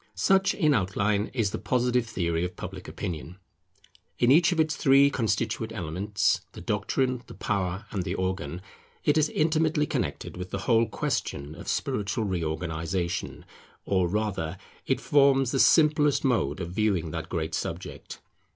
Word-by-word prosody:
Such, 190 - +3
in 155 -6 +3
outline, 105 0 0
is 110 -6 0
the - - -4
Positive 125 +2 +1
theory 85 -5 -1
of 90 0 -4
Public 95 0 -8
Opinion. 85 -3 -6 0.8
In 120 +1 +4
each 165 +5 +5
of 170 - -1
its 155 0 +2
three 140 0 +5
constituent 110 -1 -1
elements, 100 +1 0
the - - -9
Doctrine, 130 -2 -1
the - - -11
Power, 95 0 -2
and 100 - -2
the - - -3
Organ, 95 -1 -3 0.4
it 150 - +3
is 155 -1 +3
intimately 155 -1 +1
connected - - -3
with 90 0 -6
the - - -3
whole 115 -1 +4
question 70 -5 -3
of 85 +1 -11
spiritual 115 -3 -1
reorganization; 85 -1 -3 0.4
or 95 -3 +2
rather, 95 -3 -2 0.3
it - - +1
forms 135 -3 +3
the 135 - 0
simplest 150 -2 +4
mode 115 - +1
of 85 0 -5
viewing 95 -5 0
that 80 0 -5
great 80 -3 -3
subject. - - -5
105 Hz, 150 wpm, -27 LUFS, 90-135 Hz, 0.8 s, each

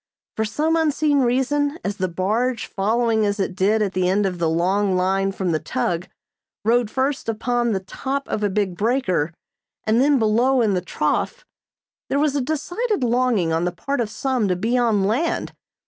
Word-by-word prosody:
For 220 - 0
some 305 +10 0
unseen 305 -2 +2
reason, 275 +4 +1
as 200 0 -2
the 185 - 0
barge, 215 +8 -1
following 220 +2 +1
as 205 0 0
it 190 -1 -1
did 210 +3 +2
at 195 -2 -2
the 180 -1 +1
end 200 +2 +2
of 180 -2 -2
the 165 -1 +1
long 185 +4 +1
line 195 +1 +1
from 190 -2 -2
the 155 - +1
tug, 170 +6 -2 0.6
rode 235 0 +3
first 265 0 -1
upon 240 +2 0
the 190 - -1
top 270 +8 -4
of 215 - -2
a 205 - +1
big 190 -2 -1
breaker 205 - 0 0.5
and 220 +3 +2
then 285 +1 +4
below 240 +4 +3
in 210 -3 +2
the 180 - 0
trough, 180 - -2 0.6
there 275 - +1
was 290 -1 +1
a 285 - +1
decided 350 - -2
longing 235 -8 +1
on 165 +1 +1
the 180 - 0
part 275 +10 -2
of 225 - -2
some 245 0 -1
to 180 - +1
be 225 +7 -1
on 230 -5 +2
land. 245 +12 0
220 Hz, 190 wpm, -22 LUFS, 190-260 Hz, 0.6 s, then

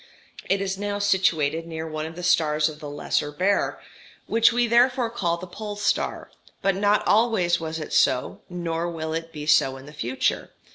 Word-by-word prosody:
It 195 0 +2
is 190 -1 -2
now 205 0 -2
situated 165 -6 +1
near 160 -1 -5
one 155 0 -4
of 160 - -10
the 180 - -7
stars 155 -3 +3
of 150 -1 -10
the 150 -2 -7
Lesser 145 0 -1
Bear, 185 +7 0 0.5
which 230 +1 +4
we 240 +1 +2
therefore 240 +1 +3
call 170 -7 -1
the 180 - -8
Pole 205 +3 -7
star; 205 0 -1 0.3
but 195 -1 +2
not 205 +1 +2
always 205 -6 +3
was 160 -1 -4
it 155 - -6
so, 125 -1 +2
nor 170 -1 -3
will 160 -1 -4
it 165 0 -4
be 150 -2 -7
so 135 -3 +3
in 135 - -12
the 150 - -12
future. 130 -3 -1
170 Hz, 190 wpm, -24 LUFS, 155-205 Hz, 0.5 s, which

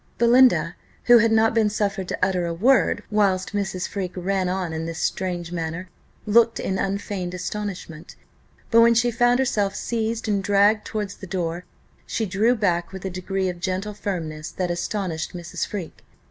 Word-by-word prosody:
Belinda, 245 +2 +4 0.3
who 240 -1 +7
had 230 0 +3
not 225 0 +4
been 220 -2 +3
suffered 200 -2 -2
to - - -3
utter 185 -2 +1
a 170 - -3
word 250 +9 +3
whilst 195 -2 +1
Mrs. 190 -3 -2
Freke 185 -3 -5
ran 185 0 0
on 180 -3 -2
in 160 +1 -3
this 165 -1 -5
strange 175 -1 -2
manner, 170 +2 -4 0.4
looked 230 +2 +4
in 190 0 -2
unfeigned 195 -2 -3
astonishment; 180 -4 -6 0.6
but 230 0 +7
when 235 0 +6
she 240 +1 +3
found 240 +1 +3
herself 210 -7 0
seized 225 -1 -2
and 200 -2 0
dragged 205 +2 +3
towards 210 -2 -4
the 190 - -9
door, 175 -1 -3 0.4
she 225 - -1
drew 210 +6 +2
back 175 -6 0
with 190 0 -8
a 190 - -3
degree 190 +1 -2
of 180 -1 -4
gentle 190 +3 -3
firmness 160 -7 -4
that 180 -2 -3
astonished 175 -2 -3
Mrs. 175 0 -4
Freke. 190 -6 -7
195 Hz, 175 wpm, -23 LUFS, 180-215 Hz, 0.6 s, who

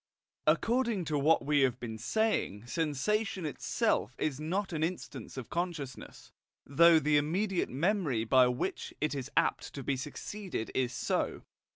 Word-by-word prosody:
According 225 +4 +2
to 150 -2 0
what 155 +1 +3
we 145 0 +3
have 130 -3 +2
been 110 -2 -6
saying, 120 - 0
sensation 170 - -1
itself 130 -4 0
is 150 -3 -1
not 180 +5 -2
an 155 -1 -1
instance 145 - -5
of 130 - -7
consciousness, 165 -7 -5 0.3
though 165 +4 +6
the 150 -1 +3
immediate 180 +6 0
memory 150 - 0
by 125 +2 +5
which 125 +1 -3
it 150 0 0
is 140 -1 -4
apt - - +1
to 140 - -5
be 140 - 0
succeeded 150 - -5
is 125 -2 0
so. - - -1
150 Hz, 150 wpm, -31 LUFS, 130-180 Hz, 0.3 s, though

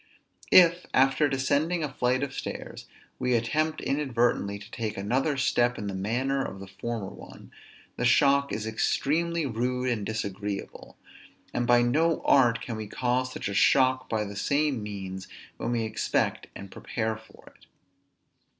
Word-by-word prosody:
If, 175 -1 +6
after 135 +3 +4
descending 145 +5 0
a 145 -3 -4
flight 125 +2 +1
of 135 -2 -4
stairs, - - -6 0.3
we 125 -1 +1
attempt 155 +7 0
inadvertently 120 -7 0
to 100 +3 -13
take 110 -2 -4
another 130 +9 0
step 120 -2 +2
in 105 - -5
the 100 - -3
manner 125 +8 -1
of 95 - -6
the 100 - -8
former 100 +2 -5
ones, - - -13 0.5
the - - -2
shock 140 +3 +4
is 110 - -3
extremely 160 +9 0
rude 125 +1 -1
and 115 -4 -1
disagreeable: 100 -2 -5 0.6
and 120 0 -1
by 120 0 +5
no 155 +7 +1
art 120 -4 +4
can 115 -3 -5
we 110 -1 -5
cause 125 +3 -1
such - - -4
a 100 - -3
shock 130 +4 +3
by 110 -1 0
the 100 0 -7
same 140 +3 0
means 95 -2 -6 0.3
when - - -3
we 115 -1 0
expect 110 0 -1
and 100 -1 -9
prepare 110 -1 -3
for 110 0 -16
it. - - -23
120 Hz, 160 wpm, -27 LUFS, 110-135 Hz, 0.6 s, If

